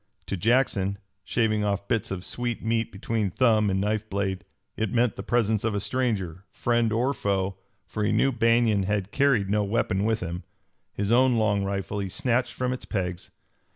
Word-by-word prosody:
To -, -, -3 dB
Jackson, 100 Hz, -2 st, +1 dB, 0.3 s
shaving 110 Hz, 0 st, +1 dB
off 100 Hz, -1 st, -1 dB
bits 115 Hz, -2 st, 0 dB
of 95 Hz, -1 st, -4 dB
sweet 120 Hz, -1 st, -3 dB
meat 115 Hz, 0 st, 0 dB
between 105 Hz, +1 st, -1 dB
thumb 110 Hz, 0 st, +3 dB
and 95 Hz, 0 st, +1 dB
knife 105 Hz, +2 st, -1 dB
blade, 95 Hz, -2 st, -2 dB, 0.3 s
it 110 Hz, -1 st, -1 dB
meant 120 Hz, -3 st, +2 dB
the -, -, -5 dB
presence 110 Hz, -1 st, +1 dB
of 110 Hz, -2 st, 0 dB
a -, -, +1 dB
stranger, 100 Hz, -7 st, -1 dB
friend 120 Hz, -2 st, +1 dB
or 125 Hz, +5 st, +1 dB
foe, 95 Hz, -4 st, -1 dB, 0.3 s
for 105 Hz, -, -3 dB
he 105 Hz, -, +2 dB
knew 135 Hz, -, +3 dB
Banion 115 Hz, -3 st, +3 dB
had 100 Hz, 0 st, -1 dB
carried 135 Hz, -8 st, +3 dB
no 105 Hz, 0 st, +2 dB
weapon 100 Hz, -2 st, 0 dB
with 110 Hz, 0 st, +1 dB
him. 90 Hz, 0 st, -4 dB, 0.5 s
His 100 Hz, +1 st, -2 dB
own 125 Hz, +1 st, +5 dB
long 105 Hz, -3 st, +2 dB
rifle 100 Hz, +1 st, -3 dB
he 100 Hz, -1 st, -3 dB
snatched 120 Hz, +5 st, 0 dB
from 125 Hz, 0 st, -1 dB
its 125 Hz, -, -6 dB
pegs. 90 Hz, -4 st, -3 dB
105 Hz, 185 wpm, -26 LUFS, 100-115 Hz, 0.5 s, own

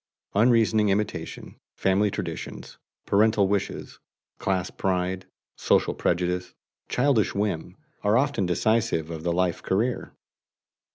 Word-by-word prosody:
Unreasoning 110 Hz, -1 st, +4 dB
imitation, 105 Hz, +2 st, -3 dB, 0.2 s
family 95 Hz, +2 st, +2 dB
traditions, -, -, -6 dB, 0.3 s
parental 105 Hz, -1 st, +3 dB
wishes, 100 Hz, 0 st, -3 dB, 0.4 s
class 95 Hz, -1 st, -1 dB
pride, 95 Hz, 0 st, -1 dB, 0.3 s
social -, -, +2 dB
prejudice, 90 Hz, +1 st, -1 dB, 0.3 s
childish 125 Hz, -6 st, +2 dB
whim, 95 Hz, -3 st, -2 dB, 0.3 s
are 105 Hz, +2 st, +4 dB
often 130 Hz, -8 st, +1 dB
decisive 90 Hz, -3 st, +1 dB
of 80 Hz, -1 st, -5 dB
the 85 Hz, +1 st, -1 dB
life 90 Hz, 0 st, 0 dB
career. 115 Hz, +6 st, -1 dB
100 Hz, 105 wpm, -26 LUFS, 90-110 Hz, 0.4 s, Unreasoning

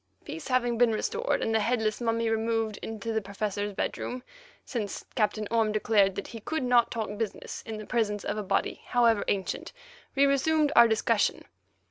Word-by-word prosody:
Peace 160 Hz, -, -7 dB
having 245 Hz, -2 st, +1 dB
been 240 Hz, -2 st, +5 dB
restored, 455 Hz, -, -1 dB
and 225 Hz, -, 0 dB
the 220 Hz, -, +4 dB
headless 220 Hz, 0 st, 0 dB
mummy 230 Hz, 0 st, 0 dB
removed 225 Hz, -1 st, 0 dB
into 225 Hz, +1 st, -4 dB
the 220 Hz, -, +1 dB
Professor's 205 Hz, +1 st, -3 dB
bedroom, 250 Hz, +5 st, -3 dB, 0.4 s
since 215 Hz, -6 st, -4 dB
Captain 215 Hz, -1 st, 0 dB
Orme 225 Hz, -2 st, +2 dB
declared 210 Hz, -2 st, +3 dB
that 200 Hz, -, -5 dB
he 230 Hz, -, -7 dB
could 315 Hz, +6 st, -3 dB
not 245 Hz, -1 st, +4 dB
talk 220 Hz, -2 st, -3 dB
business 225 Hz, -3 st, -4 dB
in 220 Hz, -1 st, -4 dB
the 215 Hz, -, -7 dB
presence 210 Hz, -4 st, 0 dB
of -, -, -1 dB
a 215 Hz, -, -2 dB
body, 195 Hz, -, -1 dB
however 235 Hz, -3 st, +3 dB
ancient, 195 Hz, -2 st, -2 dB, 0.4 s
we 280 Hz, 0 st, +5 dB
resumed 295 Hz, +2 st, +2 dB
our 235 Hz, 0 st, +9 dB
discussion. 220 Hz, -1 st, +1 dB
225 Hz, 175 wpm, -28 LUFS, 210-240 Hz, 0.4 s, our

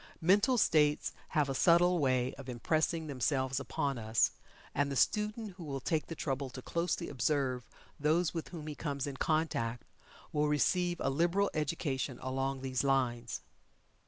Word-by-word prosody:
Mental 200 Hz, +9 st, +4 dB
states 150 Hz, -7 st, +3 dB, 0.2 s
have 150 Hz, -2 st, +4 dB
a 135 Hz, -, -1 dB
subtle 175 Hz, +4 st, +4 dB
way 130 Hz, -3 st, +1 dB
of 135 Hz, -1 st, -10 dB
impressing 155 Hz, +6 st, 0 dB
themselves 135 Hz, -1 st, 0 dB
upon 140 Hz, -1 st, -2 dB
us, 110 Hz, 0 st, +2 dB, 0.4 s
and 140 Hz, 0 st, +1 dB
the -, -, -2 dB
student 210 Hz, -, +1 dB
who 175 Hz, -, -8 dB
will 140 Hz, -3 st, -4 dB
take 155 Hz, +3 st, -1 dB
the 165 Hz, -, -5 dB
trouble 135 Hz, -3 st, -2 dB
to 130 Hz, -, -8 dB
closely 170 Hz, 0 st, -1 dB
observe 130 Hz, -2 st, 0 dB, 0.3 s
those 155 Hz, +3 st, +2 dB
with 165 Hz, -2 st, -4 dB
whom 165 Hz, -4 st, -8 dB
he 155 Hz, -, -4 dB
comes 140 Hz, -3 st, -3 dB
in 140 Hz, -2 st, -5 dB
contact 135 Hz, -8 st, 0 dB, 0.5 s
will 150 Hz, 0 st, +2 dB
receive 175 Hz, +4 st, +1 dB
a 135 Hz, -, +1 dB
liberal 175 Hz, +7 st, +2 dB
education 145 Hz, -4 st, -2 dB
along 135 Hz, +1 st, -2 dB
these 130 Hz, -1 st, -1 dB
lines. 125 Hz, -4 st, 0 dB
145 Hz, 160 wpm, -33 LUFS, 130-165 Hz, 0.5 s, Mental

